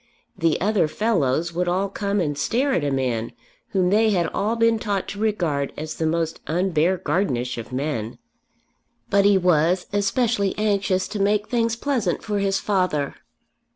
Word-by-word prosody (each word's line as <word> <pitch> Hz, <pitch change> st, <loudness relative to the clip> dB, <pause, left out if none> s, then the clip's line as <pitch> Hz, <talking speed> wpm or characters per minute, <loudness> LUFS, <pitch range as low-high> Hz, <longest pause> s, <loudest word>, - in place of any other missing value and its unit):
"The 165 Hz, -2 st, +1 dB
other 205 Hz, -4 st, +2 dB
fellows" 170 Hz, -, 0 dB
would 180 Hz, +1 st, -1 dB
all 185 Hz, +3 st, +1 dB
come 200 Hz, +1 st, -2 dB
and 150 Hz, -5 st, -1 dB
stare 260 Hz, -, 0 dB
at 170 Hz, -, +1 dB
a 145 Hz, -, +1 dB
man 125 Hz, -4 st, -1 dB, 0.3 s
whom 185 Hz, -2 st, +1 dB
they 220 Hz, +2 st, +4 dB
had 180 Hz, -5 st, +2 dB
all 220 Hz, +3 st, -1 dB
been 230 Hz, -1 st, +3 dB
taught 205 Hz, -4 st, -2 dB
to 200 Hz, -, -6 dB
regard 170 Hz, -10 st, 0 dB
as 155 Hz, +1 st, -4 dB
the 160 Hz, -, -1 dB
most 165 Hz, 0 st, -1 dB
un 180 Hz, +4 st, 0 dB
Beargardenish 155 Hz, -7 st, 0 dB
of 115 Hz, -, -8 dB
men. 125 Hz, -4 st, -3 dB, 0.9 s
But 200 Hz, 0 st, +4 dB
he 200 Hz, -1 st, +5 dB
was 180 Hz, 0 st, +2 dB
especially 205 Hz, 0 st, +1 dB
anxious 200 Hz, -3 st, +1 dB
to 210 Hz, 0 st, -4 dB
make 205 Hz, +1 st, +1 dB
things 230 Hz, -2 st, +1 dB
pleasant 235 Hz, -, -1 dB
for 210 Hz, -2 st, -1 dB
his 195 Hz, -1 st, +1 dB
father. 185 Hz, -8 st, 0 dB
185 Hz, 165 wpm, -23 LUFS, 155-205 Hz, 0.9 s, he